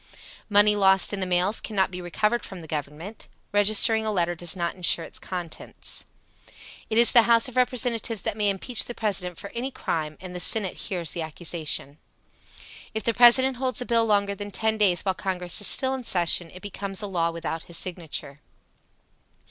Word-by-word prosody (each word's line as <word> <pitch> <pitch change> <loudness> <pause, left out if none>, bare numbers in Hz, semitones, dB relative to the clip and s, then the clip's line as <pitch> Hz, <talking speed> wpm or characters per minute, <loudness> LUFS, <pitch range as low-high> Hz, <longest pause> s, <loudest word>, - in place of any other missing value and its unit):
Money 205 0 +5
lost 195 -1 +3
in 200 - -3
the 185 - -2
mails 180 +4 +1
cannot 195 -4 -1
be 180 0 -7
recovered 210 +7 -1
from 190 -3 -8
the 160 - -11
Government. 155 +7 -6 0.3
Registering 215 +2 +4
a 215 - -2
letter 175 -3 0
does 175 +1 -2
not 170 -2 -2
insure 175 -2 0
its - - -12
contents. 175 -3 -6 0.8
It 220 - -1
is 235 0 +7
the 235 -1 +5
House 230 +1 +4
of 255 - -10
Representatives 245 -4 0
that - - -2
may 210 -1 +1
impeach 210 +5 0
the 240 - -7
President 185 -5 -2
for 200 - -8
any 245 +3 -4
crime, 155 - -4
and 180 -1 -9
the - - -4
Senate 195 0 +3
hears 175 -5 -4
the 170 - -5
accusation. 160 -2 -4 1.0
If 220 - -2
the 230 - +1
President 245 +2 +6
holds 255 -2 -2
a 250 - -3
bill 230 -1 +2
longer 200 -1 +1
than 205 +1 -7
ten 220 +2 0
days 185 -4 +2
while 190 - +1
Congress 180 -1 -1
is 205 - +3
still 260 0 +3
in 260 -1 -5
session, 175 -4 +2
it 185 - -13
becomes 200 0 -4
a - - -3
law 170 -3 0
without 165 -1 -5
his 170 - -2
signature. 160 -5 -4
195 Hz, 190 wpm, -25 LUFS, 175-220 Hz, 1.0 s, is